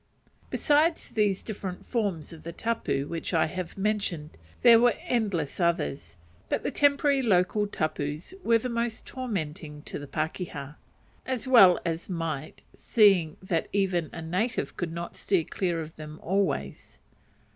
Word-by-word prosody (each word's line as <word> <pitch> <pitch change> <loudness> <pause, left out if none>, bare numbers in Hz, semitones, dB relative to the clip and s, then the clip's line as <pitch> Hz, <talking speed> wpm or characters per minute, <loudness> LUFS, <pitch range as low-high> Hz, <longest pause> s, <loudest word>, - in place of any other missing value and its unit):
Besides 310 +2 +2
these 205 -3 +1
different 195 -4 -6
forms 200 - -2
of 160 - -11
the 170 - -6
tapu 225 -8 -1
which 165 +3 -3
I 160 - +4
have 180 +2 -5
mentioned, 195 -7 -1 0.3
there 235 -2 +9
were 245 0 +4
endless 200 - -1
others; 170 - -1 0.3
but - - 0
the - - -1
temporary 285 -1 +3
local 205 -1 +2
tapus 155 - -3
were 230 0 +5
the 230 - -3
most 235 -1 -2
tormenting 155 - -5
to - - -6
a 145 - -8
pakeha: 155 -1 -4 0.5
as 260 -2 -2
well 195 -9 +8
they 165 -1 0
might, 165 -4 -4
seeing 195 -8 +3
that 170 -3 -1
even 185 -5 +1
a 165 - -7
native 185 +9 -1
could 175 -2 -3
not 170 +1 -6
steer 190 -5 +1
clear 175 0 -2
of 160 0 -8
them 155 0 -9
always. 180 - -1
180 Hz, 145 wpm, -27 LUFS, 160-220 Hz, 0.5 s, there